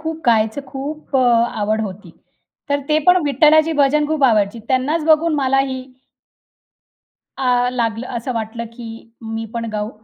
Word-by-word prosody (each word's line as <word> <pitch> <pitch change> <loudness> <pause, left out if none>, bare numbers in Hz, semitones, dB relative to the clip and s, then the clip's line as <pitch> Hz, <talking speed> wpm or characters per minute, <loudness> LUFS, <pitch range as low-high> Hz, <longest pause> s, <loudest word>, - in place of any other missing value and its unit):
खूप 320 0 -5
गायचं 220 +2 +2
खूप 280 +2 -5
अ, - - +4 0.4
आवड 215 +1 0
होती. 195 -3 -6 0.6
तर 285 0 0
ते 305 0 +3
पण 360 - +7
विठ्ठलाची 305 +3 +4
भजन 295 0 +2
खूप 305 -2 0
आवडायची. 215 -3 +2
त्यांनाच 285 +5 0
बघून 320 0 +3
मला 270 -2 +1
ही 260 -1 -5 1.6
अ, 245 -1 +2
लागलं 230 -1 -2
असं 235 +2 -3
वाटलं, 225 +1 -4
की 230 -1 -10
मी 225 0 -5
पण 230 - -3
गाऊ 210 0 -3
255 Hz, 150 wpm, -19 LUFS, 225-300 Hz, 1.6 s, पण